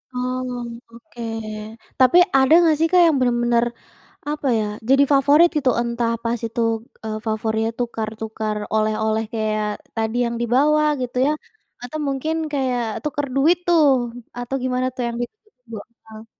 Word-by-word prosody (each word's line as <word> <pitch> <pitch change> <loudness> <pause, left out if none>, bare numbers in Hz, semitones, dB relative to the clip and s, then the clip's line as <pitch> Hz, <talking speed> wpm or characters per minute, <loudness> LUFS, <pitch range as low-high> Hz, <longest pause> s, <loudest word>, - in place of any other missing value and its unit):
Oh 250 -2 -4
oke. 235 +1 -13 0.8
Tapi 255 +6 +6 0.2
ada 265 +3 +4
nggak 320 -2 +4
sih 325 - +3
Kak 365 -1 +6
yang 320 - +3
benar-benar 240 -1 +2 0.6
apa 295 -2 -2
ya 215 - 0 0.2
jadi 270 +1 +6
favorit 290 +5 +5
itu 275 -3 +2
entah 235 -1 -1
pas 235 0 -1
itu, 230 +1 -3 0.4
eee, 215 -1 -3
favorit 220 0 0
tukar-tukar 220 -2 -3 0.2
oleh-oleh 220 0 +1
kayak 215 -1 -1 0.3
tadi 225 +1 -1
yang 235 0 -2
dibawa 285 +6 +3 0.2
gitu 250 0 -4
ya, - - +2 0.5
atau 305 +5 -5
mungkin 280 +4 -1 0.2
kayak 260 -3 0 0.2
tukar 290 -1 -2
duit 315 +6 +4
tuh 335 -3 +5 0.6
atau 245 +2 -4
gimana 255 0 0
tuh 250 - -3
yang 235 - -4
ditunggu, 250 - -10 0.3
heeh. 220 0 -12
245 Hz, 145 wpm, -21 LUFS, 225-275 Hz, 0.8 s, Tapi